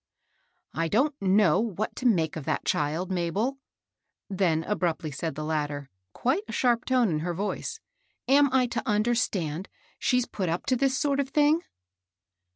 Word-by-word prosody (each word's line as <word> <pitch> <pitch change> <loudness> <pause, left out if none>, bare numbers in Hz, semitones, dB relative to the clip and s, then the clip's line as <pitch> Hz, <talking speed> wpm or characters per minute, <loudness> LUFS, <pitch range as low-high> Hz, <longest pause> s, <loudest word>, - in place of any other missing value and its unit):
I 165 +1 0
don't 260 - +2
know 190 -3 +4
what 215 -2 -2
to 255 - +1
make 165 -9 +2
of 160 - -5
that - - -1
child, 155 +6 -1
Mabel," 195 +10 -1 0.7
then 175 -5 +1
abruptly 170 -5 -1
said 145 +2 -4
the 155 - -4
latter, 145 -3 -2 0.2
quite 265 - 0
a - - -6
sharp 240 -2 +1
tone 255 -4 +3
in 155 -3 0
her 170 +2 -3
voica 205 - -3 0.5
"Am 280 0 +5
I 260 -1 +4
to 240 - -2
understand 210 -6 0 0.3
she's 250 -1 +2
put 190 -7 -3
up 170 +2 -2
to 260 - +2
this 265 +1 +1
sort 280 -1 +1
of 275 -1 0
thing? 300 +3 +3
200 Hz, 165 wpm, -27 LUFS, 165-255 Hz, 0.7 s, Am